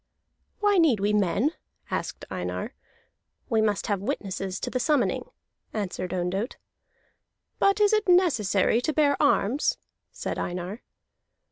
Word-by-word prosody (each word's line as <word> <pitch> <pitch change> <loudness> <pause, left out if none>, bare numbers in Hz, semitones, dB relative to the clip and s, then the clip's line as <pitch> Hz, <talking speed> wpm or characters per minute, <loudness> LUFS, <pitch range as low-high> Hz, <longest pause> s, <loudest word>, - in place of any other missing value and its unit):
"Why 410 -2 +4
need 295 -11 +4
we 205 +1 +1
men?" 210 - +2 0.4
asked - - -3
Einar. - - -4 0.8
"We 225 -3 +3
must 210 -2 +1
have 200 -3 -1
witnesses 195 -2 -3
to - - -3
the 255 - -1
summoning," 300 - +1 0.4
answered 185 -4 -3
Ondott. 185 +6 -2 1.0
"But 395 +1 +3
it - - +5
is 415 +1 +4
not 430 -1 +2
necessary 240 - +3
to 310 - -1
bear 290 -1 +3
arms," 285 -2 +2 0.3
said - - -4
Einar. 180 +5 -4
225 Hz, 130 wpm, -26 LUFS, 195-310 Hz, 1.0 s, it